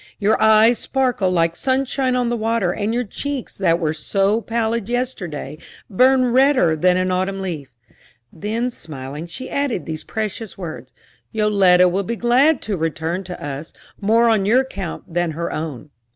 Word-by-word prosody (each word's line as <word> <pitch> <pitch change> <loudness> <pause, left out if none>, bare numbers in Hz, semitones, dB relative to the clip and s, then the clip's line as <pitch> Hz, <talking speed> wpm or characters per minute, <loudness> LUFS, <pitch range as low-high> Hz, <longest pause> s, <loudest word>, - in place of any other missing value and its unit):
"Your 215 +1 +1
eyes 220 +2 +5
sparkle 250 -8 0
like 165 -2 +1
sunshine 260 +1 0
on 245 -1 +1
the 240 - 0
water, 225 -5 0
and 210 +1 -2
your 245 +2 0
cheeks 275 +4 -5
that 170 -3 +2
were 155 -3 0
so 195 +7 0
pallid 230 -1 -2
yesterday 180 - -3 0.3
burn 255 +3 +4
redder 260 - +4
than 180 +3 +3
an 185 0 0
autumn 190 +2 -1
leaf." 165 -8 -5 0.6
Then, 225 +7 -2
smiling, 150 - -7
she 215 +10 -7
added 280 -9 -2
these 155 -1 -5
precious 220 0 -5
words: 155 -9 -7 0.4
"Yoletta 195 -4 +4
will 185 +3 0
be 230 +4 -3
glad 250 +6 +3
to 205 -3 -2
return 165 +3 -2
to 180 0 -7
us, 145 +2 -6 0.3
more 225 +3 +3
on 220 -4 +3
your 230 +6 +4
account 200 -10 -6
than 175 -2 0
her 170 +2 -3
own." 155 -2 -5
200 Hz, 165 wpm, -20 LUFS, 170-235 Hz, 0.6 s, eyes